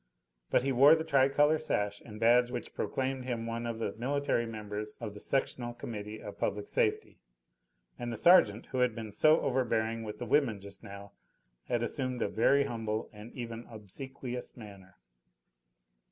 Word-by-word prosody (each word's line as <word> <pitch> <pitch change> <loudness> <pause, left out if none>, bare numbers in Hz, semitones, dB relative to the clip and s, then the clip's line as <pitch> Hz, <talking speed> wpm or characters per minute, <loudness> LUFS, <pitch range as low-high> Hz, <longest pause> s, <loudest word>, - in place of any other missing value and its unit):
But - - +3
he 135 - +1
wore 140 +5 +7
the 160 - -2
tricolour 145 +1 +3
sash 105 -10 -1
and 105 -2 -10
badge 120 +2 +5
which 125 -1 -5
proclaimed 130 -1 -2
him 120 -3 -3
one 115 +1 -3
of 115 -1 -3
the 110 -3 -2
military 130 -1 0
members 105 -1 -6
of 110 -4 -5
the 105 - -10
Sectional 120 -2 -2
Committee 110 -2 -6
of 105 - -9
Public 100 0 -2
Safety, - - 0 0.8
and 120 -1 -3
the 115 - -4
sergeant, 115 - +5
who 130 - -1
had 125 -3 +2
been 110 -2 -6
so 155 +9 +5
overbearing 115 -3 0
with 105 -1 -6
the 120 - -5
women 130 -6 +2
just 100 0 -11
now, 100 0 -10 0.6
had 120 -1 0
assumed 130 0 -2
a - - +1
very 140 +5 +4
humble 115 -4 -3
and 105 +2 -11
even 115 -1 -6
obsequious 125 +4 -7
manner. 100 -4 -12
115 Hz, 170 wpm, -31 LUFS, 105-130 Hz, 0.8 s, wore